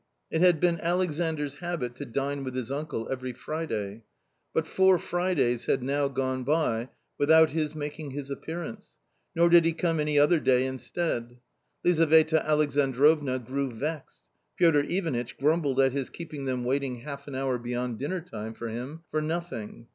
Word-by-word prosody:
It 160 Hz, -, 0 dB
had 180 Hz, -3 st, +5 dB
been 175 Hz, 0 st, +2 dB
AlexanoVs 160 Hz, -4 st, -1 dB
habit 170 Hz, -9 st, -3 dB
to 145 Hz, -, -5 dB
dine 140 Hz, +3 st, -2 dB
with 130 Hz, -1 st, -5 dB
his 130 Hz, -1 st, -3 dB
uncle 140 Hz, -5 st, -3 dB
every 130 Hz, -1 st, -3 dB
Friday. 115 Hz, -9 st, -4 dB, 0.5 s
But 160 Hz, -, 0 dB
four 190 Hz, +2 st, +4 dB
Fridays 170 Hz, -10 st, 0 dB
had 130 Hz, -, +1 dB
now 140 Hz, +2 st, +1 dB
gone 130 Hz, -1 st, -2 dB
by 130 Hz, -5 st, 0 dB, 0.3 s
without 160 Hz, +2 st, +6 dB
his 155 Hz, 0 st, -1 dB
making 150 Hz, 0 st, -5 dB
his 140 Hz, 0 st, -6 dB
appearance, 160 Hz, -1 st, -7 dB, 0.4 s
nor 170 Hz, +1 st, +5 dB
did 170 Hz, 0 st, +7 dB
he 165 Hz, 0 st, +2 dB
come 165 Hz, -1 st, 0 dB
any 150 Hz, -1 st, +1 dB
other 150 Hz, +3 st, +5 dB
day 130 Hz, -2 st, +3 dB
instead. 130 Hz, -2 st, -3 dB, 0.5 s
Lizaveta 160 Hz, -2 st, +4 dB
Alexandrovna 145 Hz, -1 st, +3 dB
grew 130 Hz, +2 st, -3 dB
vexed; 145 Hz, +5 st, -5 dB, 0.3 s
Piotr 165 Hz, -4 st, +5 dB
Ivanitch 150 Hz, -10 st, -2 dB
grumbled 145 Hz, -2 st, +1 dB
at 135 Hz, -1 st, +5 dB
his 135 Hz, -1 st, -3 dB
keeping 155 Hz, -5 st, -7 dB
them 130 Hz, -2 st, -1 dB
waiting 130 Hz, -1 st, -1 dB
half 140 Hz, +1 st, -8 dB
an 140 Hz, -, -6 dB
hour 130 Hz, -2 st, -1 dB
beyond 120 Hz, -1 st, -3 dB
dinner 175 Hz, +7 st, -2 dB
time 110 Hz, -8 st, -7 dB
for 115 Hz, -, -5 dB
him 130 Hz, +8 st, -6 dB
for 155 Hz, -, 0 dB
nothing. 155 Hz, -9 st, -4 dB
145 Hz, 160 wpm, -28 LUFS, 130-160 Hz, 0.5 s, did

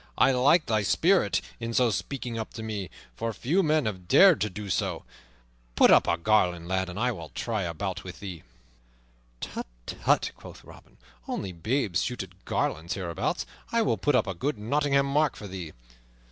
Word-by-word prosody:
I 135 Hz, -, +5 dB
like 140 Hz, +6 st, +4 dB
thy 110 Hz, -2 st, +1 dB
spirit 130 Hz, -, +3 dB, 0.2 s
in 115 Hz, 0 st, -4 dB
so 125 Hz, -2 st, +4 dB
speaking 120 Hz, +2 st, -4 dB
up 110 Hz, -1 st, -5 dB
to 110 Hz, -, -6 dB
me, 105 Hz, -4 st, -4 dB, 0.3 s
for 115 Hz, 0 st, -2 dB
few 155 Hz, -, +1 dB
men 155 Hz, -4 st, +2 dB
have 95 Hz, -5 st, -4 dB
dared 190 Hz, -, +7 dB
to 105 Hz, -, +1 dB
do 105 Hz, +2 st, -7 dB
so. 95 Hz, -, -1 dB, 0.7 s
Put -, -, +6 dB
up -, -, +6 dB
a 85 Hz, -, +2 dB
garland, 90 Hz, -3 st, +2 dB
lad, 95 Hz, 0 st, -1 dB
and 90 Hz, -, -6 dB
I 125 Hz, +1 st, +2 dB
will 85 Hz, -8 st, -8 dB
try 110 Hz, -3 st, -3 dB
a 85 Hz, -3 st, -3 dB
bout 95 Hz, +3 st, -4 dB
with 90 Hz, -1 st, -9 dB
thee." 95 Hz, -5 st, -7 dB, 1.0 s
"Tut, -, -, -5 dB, 0.2 s
tut," -, -, +1 dB
quoth -, -, -12 dB
Robin, -, -, -16 dB, 0.3 s
"only 95 Hz, -, -3 dB
babes 100 Hz, -, 0 dB
shoot 125 Hz, -5 st, -2 dB
at 95 Hz, 0 st, -17 dB
garlands 80 Hz, +2 st, -1 dB
hereabouts. 85 Hz, -4 st, -2 dB, 0.3 s
I 230 Hz, -1 st, +3 dB
will -, -, +2 dB
put 145 Hz, -, +2 dB
up -, -, +3 dB
a 95 Hz, -, -3 dB
good 130 Hz, -, -2 dB
Nottingham 140 Hz, +5 st, +1 dB
mark 145 Hz, +1 st, +1 dB
for 105 Hz, -, -8 dB
thee." 90 Hz, -4 st, -7 dB
110 Hz, 190 wpm, -27 LUFS, 95-135 Hz, 1.0 s, dared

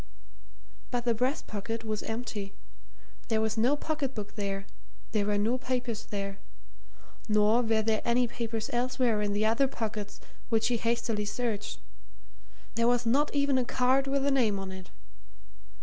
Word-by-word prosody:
But 245 Hz, -1 st, -1 dB
the 235 Hz, -, +4 dB
breast 250 Hz, +5 st, 0 dB
pocket 225 Hz, +2 st, -4 dB
was 215 Hz, -1 st, -2 dB
empty; 220 Hz, -3 st, -4 dB, 0.7 s
there 220 Hz, -2 st, +2 dB
was 220 Hz, 0 st, +1 dB
no 240 Hz, +6 st, +3 dB
pocket 295 Hz, -3 st, -2 dB
book 210 Hz, -2 st, -5 dB
there; 195 Hz, -2 st, -3 dB, 0.5 s
there 205 Hz, -2 st, +1 dB
were 205 Hz, 0 st, +2 dB
no 225 Hz, +5 st, +1 dB
papers 245 Hz, -4 st, -2 dB
there. 200 Hz, -1 st, -4 dB, 0.9 s
Nor 210 Hz, +3 st, +5 dB
were 225 Hz, -2 st, +2 dB
there 220 Hz, -1 st, +1 dB
any 240 Hz, +1 st, +3 dB
papers 230 Hz, -1 st, -3 dB
elsewhere 245 Hz, -2 st, +1 dB
in 205 Hz, -1 st, 0 dB
the 210 Hz, +1 st, +1 dB
other 230 Hz, +5 st, +4 dB
pockets 215 Hz, -4 st, -4 dB, 0.3 s
which 225 Hz, 0 st, +3 dB
he 240 Hz, -, +2 dB
hastily 230 Hz, -2 st, 0 dB
searched: 215 Hz, -1 st, -2 dB, 1.0 s
there 230 Hz, 0 st, +2 dB
was 245 Hz, 0 st, +3 dB
not 275 Hz, +6 st, +3 dB
even 280 Hz, -2 st, +3 dB
a -, -, +2 dB
card 260 Hz, +2 st, +2 dB
with 275 Hz, 0 st, +1 dB
a 280 Hz, -, +3 dB
name 230 Hz, -7 st, +3 dB
on 195 Hz, -1 st, -5 dB
it. 190 Hz, -1 st, -9 dB
230 Hz, 160 wpm, -30 LUFS, 210-250 Hz, 1.0 s, Nor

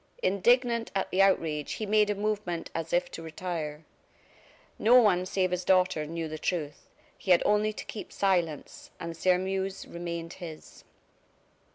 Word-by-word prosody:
Indignant 235 Hz, +5 st, +2 dB
at 195 Hz, -, -1 dB
the 190 Hz, -, +3 dB
outrage, 160 Hz, -6 st, +2 dB
he 215 Hz, -, -4 dB
made 210 Hz, 0 st, +3 dB
a 205 Hz, -, +1 dB
movement 205 Hz, -5 st, -2 dB
as 165 Hz, 0 st, -4 dB
if 175 Hz, 0 st, +1 dB
to -, -, -7 dB
retire. 160 Hz, -2 st, -5 dB, 0.9 s
No 245 Hz, +4 st, +7 dB
one, 185 Hz, -6 st, +3 dB
save 185 Hz, -1 st, 0 dB
his 180 Hz, 0 st, -1 dB
daughter, 185 Hz, -4 st, +2 dB
knew 165 Hz, 0 st, -4 dB
the 155 Hz, 0 st, -6 dB
truth; 150 Hz, -5 st, -3 dB, 0.3 s
he -, -, -8 dB
had 180 Hz, -, +6 dB
only 210 Hz, +1 st, +3 dB
to 215 Hz, -, -8 dB
keep 215 Hz, -, -7 dB
silence 175 Hz, -7 st, -1 dB
and 170 Hz, 0 st, -5 dB
Sairmeuse 190 Hz, +2 st, 0 dB
remained 170 Hz, -1 st, -5 dB
his. 160 Hz, -3 st, -10 dB
180 Hz, 155 wpm, -28 LUFS, 165-200 Hz, 0.9 s, No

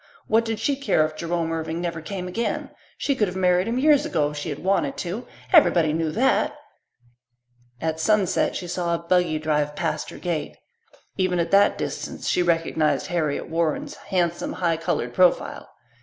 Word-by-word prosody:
What 225 Hz, +1 st, +2 dB
did 225 Hz, -2 st, -2 dB
she 280 Hz, +5 st, +1 dB
care 270 Hz, -, +2 dB
if 155 Hz, 0 st, -5 dB
Jerome 165 Hz, 0 st, -2 dB
Irving 160 Hz, 0 st, -3 dB
never 170 Hz, -2 st, -3 dB
came 180 Hz, +2 st, -5 dB
again? 230 Hz, +6 st, -2 dB, 0.3 s
She 285 Hz, -, 0 dB
could 215 Hz, -5 st, +1 dB
have 180 Hz, +1 st, -5 dB
married 180 Hz, +1 st, +3 dB
him 235 Hz, +2 st, -1 dB
years 290 Hz, +1 st, +4 dB
ago 150 Hz, -3 st, 0 dB
if 150 Hz, -, -8 dB
she 145 Hz, +3 st, -4 dB
had 145 Hz, -, -4 dB
wanted 175 Hz, -7 st, +1 dB
to 190 Hz, +7 st, -4 dB, 0.3 s
everybody 170 Hz, -, +5 dB
knew 160 Hz, 0 st, 0 dB
that! 265 Hz, +4 st, +2 dB, 1.2 s
At 160 Hz, +1 st, -2 dB
sunset 200 Hz, +2 st, +2 dB
she 180 Hz, -, -4 dB
saw 175 Hz, -1 st, -1 dB
a -, -, -1 dB
buggy 170 Hz, -1 st, +1 dB
drive 150 Hz, -1 st, 0 dB
past 155 Hz, -3 st, -2 dB
her -, -, -9 dB
gate. 165 Hz, -5 st, -3 dB, 0.6 s
Even 185 Hz, -2 st, +1 dB
at 170 Hz, -1 st, -1 dB
that 200 Hz, +1 st, +5 dB
distance -, -, -5 dB
she -, -, +2 dB
recognized 165 Hz, -3 st, +1 dB
Harriet 155 Hz, -4 st, -1 dB
Warren's 170 Hz, -, -1 dB
handsome, 175 Hz, -3 st, -2 dB
high 170 Hz, -2 st, 0 dB
coloured 125 Hz, -6 st, -2 dB
profile. 180 Hz, +3 st, +2 dB
170 Hz, 175 wpm, -24 LUFS, 160-190 Hz, 1.2 s, everybody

